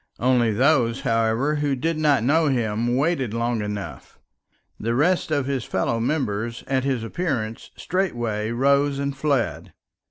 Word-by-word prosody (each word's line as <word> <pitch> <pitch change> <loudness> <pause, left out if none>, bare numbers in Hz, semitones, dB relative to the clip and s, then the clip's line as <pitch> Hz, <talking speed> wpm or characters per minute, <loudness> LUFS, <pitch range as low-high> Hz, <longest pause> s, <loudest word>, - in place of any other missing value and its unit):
Only 125 -2 +2
those, 125 +1 +2
however, 115 +4 +1
who 145 -2 0
did 160 +6 -1
not 150 -6 +2
know 155 +5 +3
him 120 -2 0
waited 135 -6 0
long 115 -1 0
enough; 105 -1 -6 0.6
the 115 +2 -1
rest 170 +7 +2
of 145 -3 0
his 135 -3 -2
fellow 115 +4 -1
members 115 -3 -2
at 130 -1 0
his 130 -4 -1
appearance 115 -6 -3
straightway 120 - -2
rose 140 +3 +2
and 140 0 -2
fled. 135 -5 -1
130 Hz, 145 wpm, -23 LUFS, 115-145 Hz, 0.6 s, know